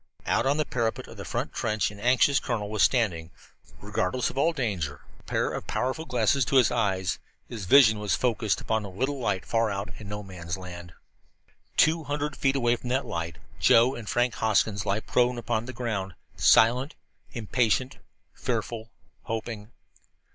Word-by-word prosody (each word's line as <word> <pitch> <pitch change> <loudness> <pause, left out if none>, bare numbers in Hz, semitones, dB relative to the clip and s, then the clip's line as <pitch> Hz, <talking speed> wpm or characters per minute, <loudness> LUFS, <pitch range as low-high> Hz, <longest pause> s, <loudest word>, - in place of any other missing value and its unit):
Out - - +1
on 140 +2 +2
the 155 - +1
parapet 115 -4 -2
of - - -12
the - - -7
front - - -3
trench 110 -1 0
an 100 - -12
anxious 130 +4 +4
colonel 105 -5 -3
was 110 -2 -1
standing, 90 -10 +2 0.5
regardless 105 +8 -1
of - - -13
all 160 +4 +3
danger, 95 - -3 0.2
a - - -23
pair - - 0
of - - -5
powerful 130 +6 -2
glasses 125 0 +2
to 135 - -1
his 130 -3 +5
eyes. 95 -6 0 0.3
His 110 -5 -6
vision 110 0 +6
was 105 -1 0
focused 115 -4 0
upon 110 -1 -1
a 100 - -6
little 130 +9 -2
light 100 -6 -1
far 115 -1 +1
out 100 0 -4
in 105 -2 -9
No 105 0 -5
Man's 90 -2 -6
Land. 90 -2 -9 0.8
Two 160 0 +4
hundred 145 0 -2
feet 135 0 +1
away 120 -3 +2
from 125 - -7
that 130 +2 0
light 85 0 -4 0.2
Joe 120 +3 +5
and 115 -6 -7
Frank 120 -1 +1
Hoskins 105 -1 +1
lay 100 +2 +1
prone 125 +1 +1
upon 115 -1 -2
the 130 - -6
ground, 110 -7 -3 0.2
silent, 125 +6 +4 0.4
impatient, 120 +2 0 0.4
fearful, 115 -1 -3 0.4
hoping. 110 -2 -5
115 Hz, 175 wpm, -27 LUFS, 100-125 Hz, 0.8 s, vision